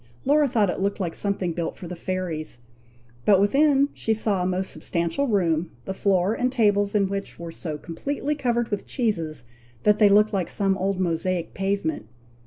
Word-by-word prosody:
Laura 290 +2 +4
thought 215 -7 +2
it - - -5
looked 200 +2 -1
like 175 -4 -2
something 195 -3 -1
built 170 0 -3
for 180 - -8
the 180 - -6
fairies; 170 -6 -4 0.7
but 195 +4 +5
within 280 +6 +4
she 220 - 0
saw 210 -3 0
a 180 - 0
most 185 +1 -1
substantial 170 +11 -1
room, 170 -7 +1 0.2
the 190 - -3
floor 190 0 +2
and 250 +2 0
tables 205 -4 +2
in 200 -2 +3
which 195 +1 -5
were 170 -1 -7
so 160 -2 -5
completely 275 - -3
covered 240 -5 0
with 205 - -3
cheeses, 170 - -1 0.4
that 210 0 +4
they 210 -2 +7
looked 210 +2 +4
like 185 -4 -1
some 195 -2 +1
old 190 0 -1
Mosaic 175 0 -1
pavement. 195 - -2
195 Hz, 185 wpm, -24 LUFS, 175-215 Hz, 0.7 s, they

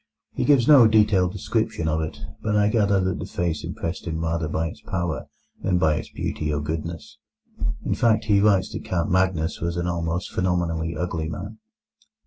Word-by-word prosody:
He - - -1
gives 140 -5 +4
no 140 -7 +8
detailed 105 -4 +3
description 100 -4 -1
of 80 0 +1
it, 80 - -5 0.2
but 105 -1 0
I 105 0 +4
gather 100 -3 +3
that 95 0 -1
the - - -4
face 85 -3 -2
impressed 85 +2 -5
him 80 -1 -2
rather 80 -1 -1
by 80 +2 -1
its - - -12
power 85 -7 -3 0.3
than 90 -2 +1
by 80 -3 +2
its - - -6
beauty 75 -1 -3
or 75 - 0
goodness; 75 -1 -5 0.7
in - - +1
fact, 115 -2 +2
he 100 -2 +4
writes 100 -3 +3
that - - -5
Count 85 -3 -1
Magnus 90 -3 +1
was 85 +1 -2
an 85 - -1
almost 85 0 -2
phenomenally 85 -3 -1
ugly 80 -1 -2
man. 100 +7 -7
85 Hz, 185 wpm, -24 LUFS, 80-100 Hz, 0.7 s, no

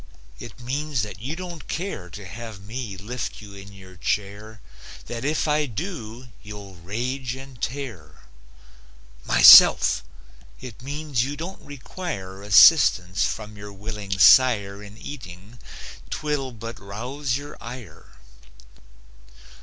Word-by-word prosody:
It - - -10
means 135 0 -2
that 105 0 -8
you 140 +7 -4
don't 175 -3 -8
care 165 - -5
To 100 +4 -10
have 110 +3 -9
me 105 0 -7
lift 115 +5 -5
you 105 -2 -12
in 100 0 -11
your 95 -1 -14
chair; 105 +4 -4 0.5
That 120 0 -6
if 155 +3 0
I 150 0 +1
do, 125 - -7
you'll 105 -2 -10
rage 120 +8 -4
and 135 -3 -12
tear. 110 - -6 1.0
"MYSELF!" - - +8 0.6
It 120 -3 -10
means 140 -2 -2
you 145 +2 -5
don't 175 +5 -7
require 135 - -7
Assistance 100 - +5
from 105 -1 -5
your 100 0 -10
willing 100 -1 -5
sire 100 -1 +5
In 105 +1 -12
eating; 110 -4 -10 0.5
'twill 145 -3 -3
but 115 0 -8
rouse 125 +7 -4
your 145 +1 -9
ire. 105 -11 -10
115 Hz, 120 wpm, -24 LUFS, 100-135 Hz, 1.0 s, MYSELF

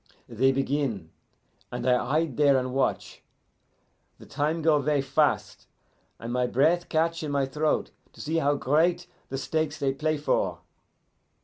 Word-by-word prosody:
"They 125 +3 +2
begin, 135 - -2 0.6
and 120 - -4
I 125 -1 +3
hide 155 -2 0
there 140 -2 +4
and 130 -1 -2
watch. 135 0 -1 1.0
The - - -14
time 155 +3 -2
go 155 -2 +4
ver' 145 -1 +1
fast, 135 - 0 0.5
and 115 +1 -6
my 125 0 +1
breath 160 +8 +2
catch 165 +1 0
in 155 - -4
my 140 -1 +1
throat 150 +3 -1 0.2
to - - -18
see 160 +2 -2
how 145 -2 +2
great 155 +6 +1 0.2
the 135 - -3
stakes 155 +2 -2
they 135 -1 0
play 155 +2 -1
for. 145 - -1
145 Hz, 150 wpm, -26 LUFS, 135-155 Hz, 1.0 s, there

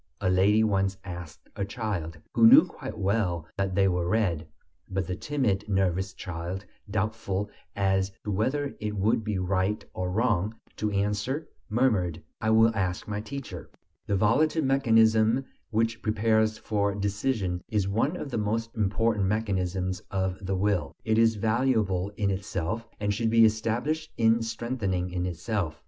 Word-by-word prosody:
a 95 -2 +1
lady 100 +4 +4
once 95 -2 +1
asked 85 -4 -8
a 100 - -2
child, 100 -6 -3 0.2
who 230 - +7
knew 270 +7 +9
quite 110 - -8
well 95 -5 0
that 95 -1 -1
they 95 0 +4
were 90 -2 0
red. 90 -7 0 0.4
But 95 -1 -1
the 90 +1 -3
timid, 105 -5 -1
nervous 95 -1 +1
child, 90 +3 -5 0.2
doubtful 105 -1 -2 0.2
as 95 -1 +1
to 105 - -3
whether 135 +8 -1
it 105 0 -3
would 110 +3 +2
be 105 -2 -2
right 95 +3 0
or 90 0 -2
wrong 105 0 +1 0.2
to 105 - 0
answer, 105 +9 -1 0.2
murmured: 105 -8 +1 0.2
"I 110 - +1
will 110 +1 +5
ask 90 -3 -1
my 105 0 -3
teacher." 115 -7 -7 0.4
The 100 - +1
volitive 150 - +3
mechanism 115 -2 +4 0.2
which 115 0 0
prepares 110 0 +2
for 100 -3 -1
decision 100 -2 -1
is 105 -3 +1
one 115 - 0
of 140 - -6
the 115 - -1
most 115 +2 -1
important 105 -1 +1
mechanisms 95 -3 -1
of 95 0 -2
the 95 +1 -1
will; 100 -1 0
it 110 0 +2
is 115 -1 +4
valuable 110 -4 +1
in 100 -2 +1
itself, 100 +3 -3
and 105 0 0
should 115 +2 0
be 115 0 +6
established 115 +9 0
and 115 0 +3
strengthened 115 -3 -2
in 90 0 -2
itself. 90 -2 -3
105 Hz, 155 wpm, -27 LUFS, 95-115 Hz, 0.4 s, knew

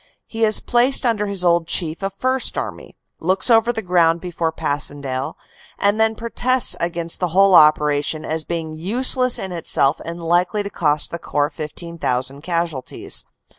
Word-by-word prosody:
He 225 0 -4
is 215 -1 +2
placed 255 +2 +2
under 215 -3 +1
his 195 -3 -2
old 170 -1 +2
chief 165 0 0
of 195 0 -4
First 255 +4 -1
Army, - - -6 0.2
looks 185 +7 0
over 225 +1 +4
the 220 -2 -5
ground 170 -2 +2
before 170 -2 -3
Passchendaele 145 -4 -3 0.4
and 205 +2 +1
then 220 0 +2
protests 240 +2 +1
against 170 -1 -3
the 180 - 0
whole 195 +3 +4
operation 150 -1 +4
as 160 0 -2
being 165 -1 -4
useless 250 +8 +2
in 190 - -5
itself 155 -4 +2
and 170 +1 -6
likely 175 +5 +1
to 200 - -6
cost 150 -4 0
the 170 - -5
Corps 145 -2 -1
15,000 150 -4 -4
casualties. 165 -5 -3
170 Hz, 160 wpm, -20 LUFS, 155-210 Hz, 0.4 s, over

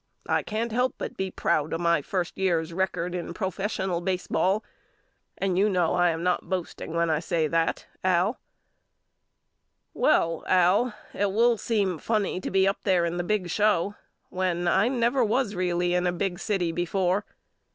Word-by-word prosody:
I - - +1
can't 225 +2 -3
help 250 +3 +1
but - - -5
be 190 0 -2
proud 155 -4 0
of 165 - -1
my 170 -2 +2
first 175 +3 -3
year's 170 -3 0
record 180 -1 -1
in 175 -1 -5
professional 190 -2 -2
baseball 185 +2 0 0.7
and 190 -2 0
you 205 +2 +4
know 180 -4 +1
I 175 0 +3
am 165 0 -2
not 180 0 0
boasting 180 -3 -4
when 170 -1 +2
I 155 - +1
say 165 -1 0
that 165 +1 0 0.2
AL 185 +5 +2 1.5
Well 165 - +2
Al 185 +6 +3 0.2
it 200 0 0
will 235 +3 +4
seem 200 -6 -1
funny 205 -3 -1
to - - -4
be 190 0 +3
up 195 - 0
there 185 -4 +3
in 170 +1 -2
the 175 - -1
big 185 -2 -1
show 205 -2 +2 0.4
when 180 -1 -1
I 190 +5 +3
never 245 0 +2
was 230 0 +1
really 175 -1 0
in 180 0 +1
a - - +2
big 175 0 -2
city 195 -5 0
before. 180 +3 0
185 Hz, 170 wpm, -26 LUFS, 175-205 Hz, 1.5 s, you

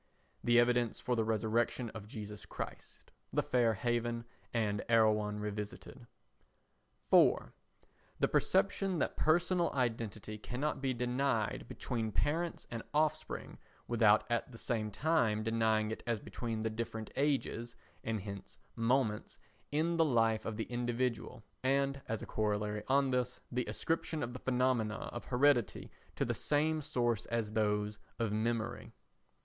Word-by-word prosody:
[The 120 0 +4
Evidence 120 -1 +2
for 125 - 0
the 115 - +2
Resurrection 110 +2 0
of 105 -2 -8
Jesus 105 -1 -8
Christ, - - -7 0.2
The - - +1
Fair 120 -3 +2
Haven 120 +1 -1 0.3
and 105 -3 0
Erewhon 105 -2 +3
Revisited.] 105 0 -6 1.0
4. - - +5 0.7
The - - +4
perception 195 -1 +2
that - - 0
personal 175 +2 +2
identity 115 -4 -2
cannot 135 +7 -2
be 130 -2 0
denied 125 -2 0
between 115 -3 -3
parents 165 +8 0
and 115 -1 -3
offspring 155 0 0 0.3
without 110 -3 +5
at 120 +2 0
the 115 - -10
same 110 -2 -1
time 110 -3 +2
denying 110 -1 +2
it 110 - -4
as 115 -2 +1
between 115 0 -4
the 110 - 0
different 110 -1 -4
ages 135 -4 0 0.3
(and 110 -2 -1
hence 100 -1 -8 0.2
moments) 115 -2 +1 0.3
in 165 +3 +1
the 165 - +6
life 115 -6 +2
of 110 -1 -3
the 110 - -1
individual 120 -1 -2 0.2
and, 135 +1 +1
as 110 -1 -2
a - - -4
corollary 105 0 -1
on 135 0 +3
this, 125 -1 0
the 125 0 0
ascription 160 -1 -1
of 120 0 -4
the 125 - -6
phenomena 125 -4 +1 0.2
of 120 - -6
heredity 125 -2 +2 0.2
to - - 0
the - - 0
same 155 +1 +1
source 120 -6 0
as 115 -2 -1
those 105 -1 0 0.2
of 115 -3 0
memory. 110 +1 -1
115 Hz, 140 wpm, -34 LUFS, 110-130 Hz, 1.0 s, the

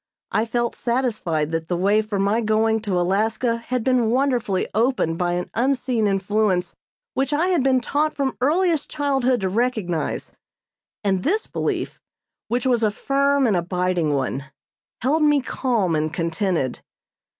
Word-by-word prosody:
I 220 - +1
felt 235 +1 -1
satisfied 215 - -1
that 165 0 -2
the 175 - -1
way 200 +4 +3
for 215 -1 -4
my 200 +4 +1
going 220 0 +2
to 200 -4 -1
Alaska 220 +6 +1
had 240 +1 -3
been 250 -3 +2
wonderfully 245 -6 +1
opened 225 -8 +1
by 175 -1 +1
an 175 0 -3
Unseen 245 -2 +1
Influence 195 -1 0 0.4
which 270 +1 0
I 320 +5 +1
had 350 -5 +2
been 260 0 +3
taught 305 +5 0
from 275 -2 -1
earliest 325 +3 +2
childhood 270 -5 +1
to 190 - 0
recognize, 205 -7 -1 0.7
and 190 -2 +1
this 415 - 0
belief, - - -3 0.5
which 245 +3 -1
was 245 -3 +2
a 215 - +3
firm 275 +5 +1
and 215 -5 +2
abiding 175 -3 0
one, 135 0 -2 0.6
held 290 +6 +2
me 295 -1 +4
calm 235 -9 0
and 155 0 0
contented. 165 - -1
225 Hz, 150 wpm, -22 LUFS, 185-260 Hz, 0.7 s, me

